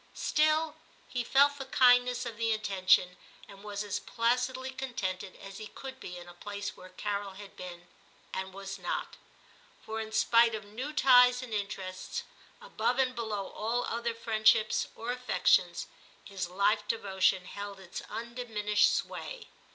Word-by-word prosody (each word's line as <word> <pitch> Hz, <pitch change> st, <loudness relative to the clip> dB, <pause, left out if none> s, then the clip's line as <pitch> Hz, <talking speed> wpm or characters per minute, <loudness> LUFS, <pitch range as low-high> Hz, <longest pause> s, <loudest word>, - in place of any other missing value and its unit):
Still 310 Hz, +1 st, +2 dB, 0.3 s
he 245 Hz, -1 st, -2 dB
felt 280 Hz, +3 st, +4 dB
the 270 Hz, -, -4 dB
kindness 245 Hz, -1 st, +4 dB
of 235 Hz, -2 st, -5 dB
the 230 Hz, 0 st, 0 dB
intention, 185 Hz, -4 st, +3 dB, 0.3 s
and 200 Hz, -1 st, -13 dB
was 205 Hz, 0 st, -4 dB
as 205 Hz, -2 st, -2 dB
placidly 250 Hz, +3 st, 0 dB
contented 195 Hz, -8 st, -4 dB
as 195 Hz, +1 st, -10 dB
he 215 Hz, -, -6 dB
could 265 Hz, +2 st, -9 dB
be 180 Hz, -, -7 dB
in 175 Hz, 0 st, -10 dB
a 175 Hz, -, -11 dB
place 205 Hz, +3 st, -6 dB
where 185 Hz, -, -12 dB
Carol 200 Hz, +1 st, -3 dB
had 200 Hz, 0 st, -11 dB
been, 175 Hz, -1 st, -9 dB, 0.5 s
and 190 Hz, 0 st, -3 dB
was 195 Hz, 0 st, -7 dB
not; 175 Hz, -, -3 dB, 0.7 s
for 220 Hz, 0 st, -4 dB
in 220 Hz, 0 st, -6 dB
spite 230 Hz, +1 st, +4 dB
of 215 Hz, -1 st, -7 dB
new 245 Hz, +8 st, -5 dB
ties 250 Hz, -3 st, +6 dB
and 240 Hz, -3 st, -7 dB
interests, 195 Hz, -3 st, -4 dB, 0.4 s
above -, -, -1 dB
and 260 Hz, -1 st, +2 dB
below 215 Hz, -4 st, -3 dB
all 235 Hz, +3 st, -1 dB
other 235 Hz, 0 st, -2 dB
friend 220 Hz, -1 st, -1 dB
ships 215 Hz, 0 st, +5 dB
or 230 Hz, +2 st, -3 dB
affections, 250 Hz, 0 st, +2 dB, 0.4 s
his 190 Hz, -3 st, -4 dB
life 200 Hz, +3 st, +2 dB
devotion 190 Hz, -4 st, +1 dB
held 200 Hz, 0 st, -7 dB
its 185 Hz, -1 st, -7 dB
undiminished 225 Hz, -3 st, +1 dB
sway. -, -, -4 dB
220 Hz, 155 wpm, -31 LUFS, 195-245 Hz, 0.7 s, ties